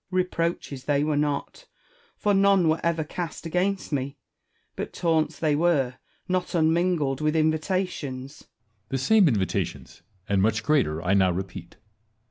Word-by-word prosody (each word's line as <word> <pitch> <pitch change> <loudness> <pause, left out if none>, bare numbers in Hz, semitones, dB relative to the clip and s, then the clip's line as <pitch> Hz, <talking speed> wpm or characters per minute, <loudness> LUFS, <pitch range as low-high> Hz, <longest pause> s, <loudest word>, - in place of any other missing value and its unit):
Wallace. 185 -1 +1
Reproaches 165 -6 -3
they 145 -1 +2
were 150 0 0
not; 145 - -2 0.5
for 205 - +1
none 195 -3 +4
were 160 +1 +2
ever 165 -1 +1
cast 170 +1 -6
against 185 +3 -1
me: 140 0 -2 0.6
but - - -5
taunts 160 -2 0
they 155 -3 +1
were, 145 -6 +1 0.3
not 185 -1 -1
unminglecl 160 -4 +1
with 155 +1 +1
invitations. 155 -4 -1
Edward. - - -22 0.5
The 135 - -3
same 220 -5 +5
invitations, 105 -9 -2 0.3
and 100 -1 +2
much 110 +2 +1
greater, 120 - +1
I 90 +2 +2
now 95 -2 +4
repeat. 90 -1 -5
155 Hz, 145 wpm, -25 LUFS, 130-175 Hz, 0.6 s, same